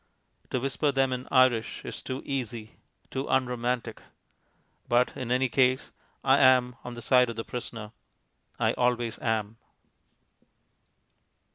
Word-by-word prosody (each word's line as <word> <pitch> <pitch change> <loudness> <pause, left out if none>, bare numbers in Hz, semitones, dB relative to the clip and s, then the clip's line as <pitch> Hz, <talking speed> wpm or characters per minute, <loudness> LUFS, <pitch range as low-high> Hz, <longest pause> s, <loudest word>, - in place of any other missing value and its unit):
To 130 - -1
whisper 135 +3 0
them 135 -1 +1
in 125 0 -5
Irish 130 -4 +2
is - - -6
too 130 +1 -5
easy, 120 -5 -4 0.3
too 135 +1 -3
unromantic. 125 -2 -1 0.9
But 120 +1 +2
in 125 -2 -5
any 130 +1 +2
case 130 +1 +2 0.3
I - - +4
am 125 -1 +5
on 125 -1 -7
the 120 - -8
side 125 0 +4
of 115 - -5
the 115 - -4
prisoner. 115 -3 -6 0.7
I - - +1
always 120 -2 0
am. 110 -2 -1
125 Hz, 130 wpm, -28 LUFS, 115-130 Hz, 0.9 s, am